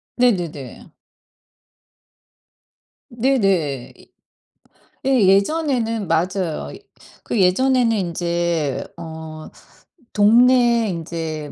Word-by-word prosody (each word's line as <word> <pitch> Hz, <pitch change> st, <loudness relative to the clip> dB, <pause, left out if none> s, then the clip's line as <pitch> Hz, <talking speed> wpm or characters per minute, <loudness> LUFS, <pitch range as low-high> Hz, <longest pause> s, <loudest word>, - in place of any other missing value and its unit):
네네네. 175 Hz, -, -1 dB, 2.2 s
네네. 195 Hz, -, 0 dB
이 -, -, -21 dB, 0.9 s
예 265 Hz, -4 st, +3 dB
예전에는 230 Hz, -, +1 dB
맞아요. 170 Hz, 0 st, -1 dB, 0.5 s
그 -, -, -2 dB
예전에는 240 Hz, +6 st, +3 dB
인제 170 Hz, -5 st, -2 dB
어 160 Hz, -1 st, -9 dB, 0.7 s
동네 235 Hz, +2 st, +4 dB
인제 160 Hz, -3 st, -5 dB
185 Hz, 135 characters per minute, -20 LUFS, 160-235 Hz, 2.2 s, 동네